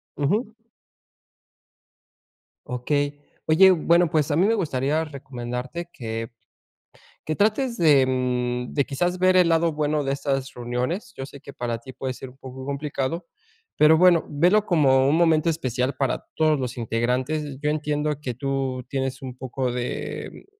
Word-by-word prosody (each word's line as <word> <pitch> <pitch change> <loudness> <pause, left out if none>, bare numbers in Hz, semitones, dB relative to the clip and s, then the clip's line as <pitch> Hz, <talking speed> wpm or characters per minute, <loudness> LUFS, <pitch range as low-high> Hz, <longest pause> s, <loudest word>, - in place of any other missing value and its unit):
Ujú. 205 - 0 2.1
Okey. 145 +3 -1 0.3
Oye, 190 +4 +7
bueno, 170 0 +3
pues 155 -1 +1
a 145 - +2
mí 180 +5 +4
me 225 - +3
gustaría 150 - 0
recomendarte 135 +3 -6
que 115 -5 -5 0.9
que 155 - -2
trates 235 +4 +1
de, 145 -7 +5
mm, 125 -1 -1
de 140 - +2
quizás 175 +6 -1
ver 185 0 +4
el 180 -2 +5
lado 165 0 +3
bueno 150 0 0
de 135 - -1
estas 135 -1 -2
reuniones. 125 - -3
Yo 135 - -5
sé 140 +1 -12
que 140 - -12
para 120 -2 -3
ti 130 +3 -12
puede 130 0 -4
ser 130 +1 -9
un 125 - -17
poco 130 0 -9
complicado. 140 +3 -3 0.5
Pero 155 +1 +6
bueno, 180 -2 +5
velo 180 +8 +3
como 135 -7 +4
un 145 - +3
momento 165 -1 +3
especial 130 -4 -1
para 135 -1 -1
todos 155 -2 +2
los 125 -2 -3
integrantes. 130 +5 -1
Yo 150 - +1
entiendo 150 -1 -1
que 125 -4 -3
tú 135 0 -2
tienes 135 0 -3
un 130 -1 -7
poco 130 -1 -3
de 125 - -5
140 Hz, 155 wpm, -24 LUFS, 130-160 Hz, 2.1 s, Oye